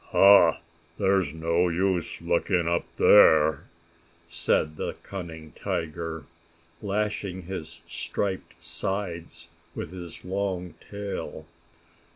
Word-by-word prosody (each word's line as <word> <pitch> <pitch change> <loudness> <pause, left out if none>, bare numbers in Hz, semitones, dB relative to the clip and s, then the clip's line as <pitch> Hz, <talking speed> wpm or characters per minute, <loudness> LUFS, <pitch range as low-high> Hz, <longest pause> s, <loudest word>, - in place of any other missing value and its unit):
"Ha! 100 -5 +7 0.4
There 95 0 +3
is 85 -7 -2
no 85 +3 +1
use 90 0 -1
looking 85 0 +1
up 85 0 +1
there!" 80 -2 +6 0.6
said 85 -2 0
the - - -3
cunning 80 -5 -8
tiger, 80 0 -3 0.6
lashing 100 -2 -2
his 85 -2 -7
striped 95 -2 -4
sides 85 -4 -4 0.3
with - - -5
his 90 -3 -9
long 95 -2 -2 0.2
tail. 100 -6 -5
85 Hz, 100 wpm, -27 LUFS, 80-95 Hz, 0.6 s, Ha